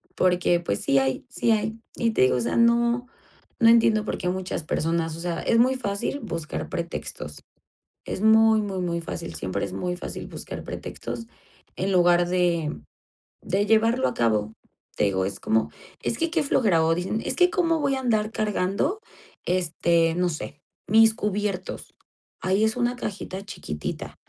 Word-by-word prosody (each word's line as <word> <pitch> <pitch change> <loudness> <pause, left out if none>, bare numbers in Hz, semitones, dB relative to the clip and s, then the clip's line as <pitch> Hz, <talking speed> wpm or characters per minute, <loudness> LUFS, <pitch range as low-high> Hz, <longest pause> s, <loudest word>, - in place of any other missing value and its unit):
porque, 180 -1 +2
pues, 100 -12 -2
sí 135 - +2
hay, 135 0 -1
sí 235 -1 +1
hay, 220 +1 0 0.2
y 230 -1 +1
te - - +1
digo, 130 -1 +3
o - - -1
sea, 120 - -1
no 235 +1 +3 0.5
no 230 -3 +6
entiendo 225 -2 +5
por - - -2
qué 180 - -4
muchas 185 -2 -3
personas, 165 +1 -1
o - - -9
sea, 175 -1 -2
es 230 - +2
muy 255 +2 +4
fácil 205 +3 -2
buscar 165 -7 -4
pretextos, 120 - -5 0.6
es - - -4
muy, 220 0 +5
muy, 195 -2 -3
muy 170 -2 -1
fácil, 165 0 -6
siempre 95 +2 -2
es - - -7
muy 180 0 -3
fácil - - -6
buscar - - -7
pretextos 230 - -6 0.5
en 190 +2 -1
lugar 175 -1 +4
de 175 - 0 0.6
de 200 +2 0
llevarlo 225 +4 +3
a - - -2
cabo, 110 -2 +1 0.4
te - - 0
digo, 95 -1 +1
es 100 0 -4
como, 110 0 +1 0.3
es - - -2
que 330 -1 -1
qué 335 -2 +2
flojera, 205 - +3
o 165 0 +3
dicen, 185 +5 -2
es - - -1
que 360 0 +5
cómo 335 -3 +1
voy 280 -2 +1
a 265 - -2
andar 220 -4 +1
cargando, 210 - -1 0.5
este, 170 -2 +2
no 180 0 +1
sé, 150 -2 -6 0.3
mis 225 +1 +6
cubiertos, 205 -4 -3 0.5
ahí 190 +3 +2
es 220 0 +2
una 245 0 +1
cajita 195 -4 -5
chiquitita 75 - -6
190 Hz, 175 wpm, -25 LUFS, 170-225 Hz, 0.6 s, no